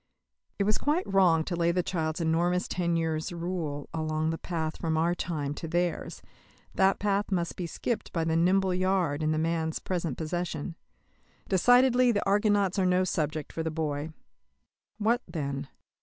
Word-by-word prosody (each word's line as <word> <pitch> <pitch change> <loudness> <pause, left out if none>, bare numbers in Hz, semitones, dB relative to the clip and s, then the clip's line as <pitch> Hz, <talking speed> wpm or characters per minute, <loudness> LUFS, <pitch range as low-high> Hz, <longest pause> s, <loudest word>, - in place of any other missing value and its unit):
It 200 - +1
was 210 +1 +1
quite 310 +5 +1
wrong 180 -5 +4
to 175 - -3
lay 170 0 +2
the 180 +1 0
child's 160 -3 -2
enormous 170 +2 +1
ten 170 -2 0
years' 160 -1 -1
rule 170 -4 -4
along 155 0 -1
the 165 - -4
path 160 -3 -3
from 160 -2 -1
our 170 +2 +2
time 150 -5 -3
to 165 - -6
theirs; 175 +1 -2 0.5
that 190 0 +3
path 205 0 0
must 175 -3 -1
be 180 - -4
skipped 220 +5 -3
by 165 - -1
the 160 0 0
nimble 185 +3 +3
yard 180 -5 +1
in 155 0 +1
the 155 - 0
man's 160 0 0
present 170 -7 -3
possession. 165 0 -3 0.7
Decidedly 245 +5 +5
the 205 - -1
Argonauts 205 -1 +2
are 190 - +3
no 180 0 +3
subject 155 -4 -2
for 165 - -3
the 160 - -1
boy. 155 -1 -3 0.9
What, 225 +3 +2
then? 140 -5 -4
170 Hz, 170 wpm, -28 LUFS, 160-190 Hz, 0.9 s, Decidedly